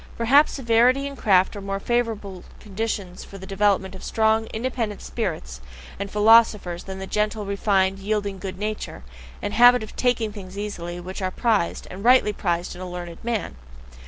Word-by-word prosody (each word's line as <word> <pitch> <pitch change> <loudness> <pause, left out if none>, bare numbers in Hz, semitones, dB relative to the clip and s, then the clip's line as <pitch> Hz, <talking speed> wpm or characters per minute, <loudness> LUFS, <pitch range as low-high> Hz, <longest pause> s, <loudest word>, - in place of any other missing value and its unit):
Perhaps 275 +6 +5
severity 250 +2 +3
and 280 0 -5
craft 190 -5 +3
are 205 - -6
more 195 0 -3
favourable 215 -5 -2 0.2
conditions 200 -3 -4
for 195 - -11
the 190 - -10
development 195 -1 +1
of 190 - -10
strong, 220 0 +1
independent 225 -3 -3
spirits 155 - -4 0.4
and 200 0 -4
philosophers 210 -4 +4
than 190 0 -6
the 190 - -5
gentle, 210 +1 -1
refined, 195 -1 +1
yielding 200 -1 -2
good 185 -1 -6
nature, 210 - -5 0.4
and 205 - -3
habit 245 +1 +6
of 215 - -10
taking 245 -3 0
things 195 -2 -10
easily, 175 -4 -5
which 185 +3 -7
are 185 - 0
prized, 210 -3 0
and 190 +2 -8
rightly 245 -3 +5
prized 175 -3 -2
in 180 - -10
a 185 - -6
learned 175 -1 -8
man. 230 - -2
205 Hz, 170 wpm, -23 LUFS, 190-225 Hz, 0.4 s, habit